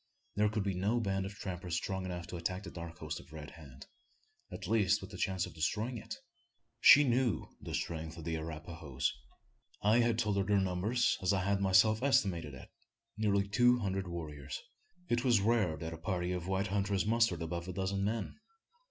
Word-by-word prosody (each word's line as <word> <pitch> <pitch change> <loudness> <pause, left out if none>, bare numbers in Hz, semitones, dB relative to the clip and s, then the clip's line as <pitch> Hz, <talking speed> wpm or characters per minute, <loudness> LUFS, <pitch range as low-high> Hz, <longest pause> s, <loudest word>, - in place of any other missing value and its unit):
There 105 0 +3
could 105 -1 -1
be 100 -1 -1
no 100 +6 +1
band 95 -3 -1
of 100 - -9
trappers 90 -3 -4
strong 95 +2 -2
enough 90 -2 -4
to 90 - -7
attack 90 +3 -3
the - - -8
dark 85 -1 -8
host 80 -1 -5
of - - -16
Red 80 -1 -8
Hand 70 -5 -12 0.7
at - - -6
least 105 -3 +3
with 95 +1 -10
the 95 - -8
chance 95 -1 0
of 90 - -10
destroying 110 +9 -1
it? 110 +1 -7 0.6
She 145 +5 +9
knew 125 - +1
the - - -4
strength 80 -1 -4
of 85 - -8
the 80 0 -2
Arapahoes. 80 -3 -3 0.7
I 110 +3 +5
had 115 -1 +2
told 105 -3 +1
her 100 - +2
their 100 +1 +2
number, 95 +3 0
as 120 -7 +2
I 95 -1 +1
had 100 +1 +1
myself 100 +4 +4
estimated 90 - +1
it 65 - -12 0.4
nearly 100 -2 +1
two 120 +4 +4
hundred 95 -4 -2
warriors. 75 -5 -6 0.5
It 120 -3 +1
was 120 -5 +4
rare 105 -6 +2
that 80 +2 -5
a 80 - -8
party 90 0 -2
of 90 -1 -3
white 95 0 0
hunters 100 -1 +1
mustered 115 -6 +2
above 85 +1 -4
a 95 - -4
dozen 95 +1 -1
men. 110 - -2
95 Hz, 195 wpm, -33 LUFS, 85-105 Hz, 0.7 s, She